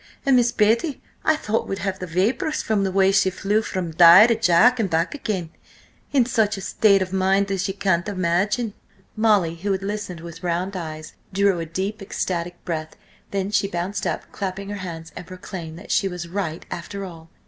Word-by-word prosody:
And 270 -1 +5
Miss 240 -1 +4
Betty 230 +7 +2 0.2
I 315 - +4
thought 225 -7 -2
would 195 - -3
have 190 -1 -2
the 185 - -5
vapours 200 - 0
from 210 -3 +1
the 190 - 0
way 190 0 +4
she 195 -1 +3
flew 200 +3 0
from 185 -5 -4
Di 170 +5 +9
to 235 - +3
Jack 225 +5 +4
and 210 -4 0
back 165 +1 0
again, 200 - -3 0.6
in 265 -4 +4
such 220 -4 +1
a - - -6
state 195 0 +3
of 185 0 -8
mind 195 +1 +2
as 190 -1 -1
ye 195 - -4
can't 185 -3 +1
imagine!" 195 +4 0 0.4
Molly, 210 -7 +3
who 200 +4 -2
had 190 0 -3
listened 200 -4 -4
with 170 0 -10
round 180 +2 -2
eyes, 155 -3 -6 0.2
drew 200 -2 +2
a 165 - -4
deep 190 +6 -3
ecstatic 175 -2 -4
breath. 160 -2 -4 0.3
Then 195 0 -2
she 200 - +2
bounced 190 +2 -3
up, - - -4
clapping 195 0 -5
her 205 - -4
hands, 165 -4 -7
and 175 - -8
proclaimed 180 -3 -8
that - - -9
she 195 - +2
was 180 -2 -5
right 170 -3 -4
after 195 +3 -5
all! 165 -3 -11
190 Hz, 200 wpm, -23 LUFS, 175-205 Hz, 0.6 s, Di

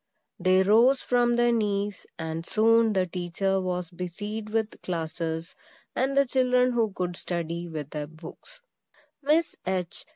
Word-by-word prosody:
They 185 +1 +4
rose 235 +7 +5
from 240 -1 +2
their 240 0 +3
knees; 205 -3 -1
and 160 0 -4
soon 225 +3 +3
the 190 -2 +2
teacher 185 +2 -1
was 180 -1 -3
busied 205 +5 -5
with 220 0 -2
classes, 165 -1 -3 0.4
and 270 +2 0
the 280 - +6
children 250 -1 +3
who 230 -3 +1
could 180 -2 -3
study, 170 -1 -4
with 155 -3 -6
their 150 -1 -4
books. 165 - -13 0.6
Miss 305 +3 +2
H. 185 -2 -3
195 Hz, 140 wpm, -27 LUFS, 170-235 Hz, 0.6 s, the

